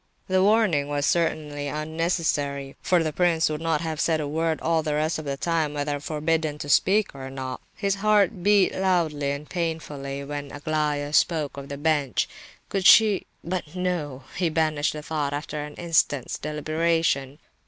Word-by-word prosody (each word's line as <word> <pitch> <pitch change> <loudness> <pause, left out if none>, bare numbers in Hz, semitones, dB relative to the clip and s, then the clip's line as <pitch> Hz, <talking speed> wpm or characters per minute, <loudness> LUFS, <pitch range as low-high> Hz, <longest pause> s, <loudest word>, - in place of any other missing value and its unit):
The 185 0 +2
warning 200 -8 +3
was 145 0 -1
certainly 150 -4 0
unnecessary; 150 -3 -1
for 180 -2 +2
the 155 -1 -2
prince 165 -2 +2
would 155 0 -4
not 165 -2 0
have 160 -2 -3
said 160 -2 +2
a 150 - -2
word 160 +2 0
all 165 0 +1
the 150 -1 -1
rest 155 +2 0
of 155 - -7
the 140 -1 -3
time 160 -2 0
whether 145 0 -2
forbidden 155 0 -1
to 145 - -6
speak 200 +7 +3
or 135 -1 -7
not. 130 -1 -5
His 200 -2 0
heart 210 -2 +3
beat 200 0 +4
loud 180 -4 +1
and 140 0 -3
painfully 150 -5 -4
when 145 0 -6
Aglaya 150 -1 -1
spoke 155 -3 +2
of 140 0 -8
the 140 - -5
bench; 145 -4 +1 0.4
could 195 -2 +1
she—but 185 -6 +3
no! 165 -8 -2
he 175 -2 +1
banished 155 -2 +1
the 150 -1 -7
thought, 145 -2 -2
after 150 0 -4
an 150 0 -9
instant's 160 -5 0
deliberation. 155 -2 0
155 Hz, 165 wpm, -25 LUFS, 145-170 Hz, 0.4 s, beat